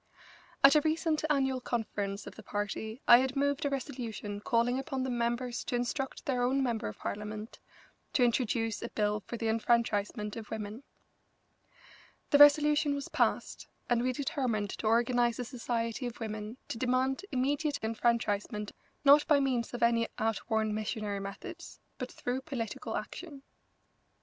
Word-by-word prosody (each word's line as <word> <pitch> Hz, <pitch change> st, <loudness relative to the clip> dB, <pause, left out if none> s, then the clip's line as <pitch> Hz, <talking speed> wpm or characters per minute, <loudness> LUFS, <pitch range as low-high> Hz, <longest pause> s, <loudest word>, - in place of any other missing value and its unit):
At 275 Hz, -, +9 dB
a 300 Hz, -, +5 dB
recent 315 Hz, 0 st, 0 dB
annual 265 Hz, -3 st, +1 dB
conference 205 Hz, -4 st, -3 dB
of -, -, -8 dB
the -, -, -11 dB
party 215 Hz, +4 st, -4 dB
I 240 Hz, -, +10 dB
had 265 Hz, +1 st, -1 dB
moved 285 Hz, +1 st, +1 dB
a -, -, +2 dB
resolution 235 Hz, -6 st, -4 dB
calling 235 Hz, +4 st, +1 dB
upon 270 Hz, -1 st, -3 dB
the 260 Hz, -, -2 dB
members 240 Hz, +1 st, -1 dB
to -, -, -2 dB
instruct 265 Hz, +3 st, -2 dB
their 255 Hz, -3 st, 0 dB
own 265 Hz, +2 st, +2 dB
member 235 Hz, -4 st, -1 dB
of 105 Hz, -, -7 dB
Parliament 210 Hz, +1 st, -5 dB, 0.5 s
to 255 Hz, -, +3 dB
introduce 230 Hz, -2 st, +1 dB
a -, -, -4 dB
bill 210 Hz, 0 st, 0 dB
for 235 Hz, +3 st, -7 dB
the 225 Hz, -, -2 dB
enfranchisement 220 Hz, -2 st, +1 dB
of 220 Hz, -2 st, -8 dB
women. 215 Hz, +2 st, -5 dB, 1.5 s
The 285 Hz, -, +6 dB
resolution 295 Hz, 0 st, +6 dB
was 280 Hz, -, -5 dB
passed, -, -, 0 dB, 0.2 s
and 240 Hz, -1 st, +4 dB
we 255 Hz, +1 st, +1 dB
determined 245 Hz, -6 st, -1 dB
to 220 Hz, -, -3 dB
organise 240 Hz, +1 st, +3 dB
a 250 Hz, -, -3 dB
society 235 Hz, 0 st, -2 dB
of 240 Hz, -, -8 dB
women 215 Hz, +1 st, -5 dB
to 225 Hz, -, -4 dB
demand 255 Hz, +2 st, +1 dB
immediate 285 Hz, +3 st, 0 dB
enfranchisement, 220 Hz, -2 st, 0 dB, 0.3 s
not 290 Hz, +2 st, +7 dB
by 295 Hz, -3 st, +5 dB
means 255 Hz, -4 st, 0 dB
of 245 Hz, -1 st, -3 dB
any 230 Hz, -1 st, +3 dB
outworn 220 Hz, 0 st, 0 dB
missionary 215 Hz, -1 st, -2 dB
methods, 340 Hz, -, -8 dB, 0.2 s
but -, -, -4 dB
through 250 Hz, +2 st, -3 dB
political 255 Hz, -7 st, -4 dB
action. 290 Hz, -6 st, -7 dB
240 Hz, 155 wpm, -31 LUFS, 220-270 Hz, 1.5 s, I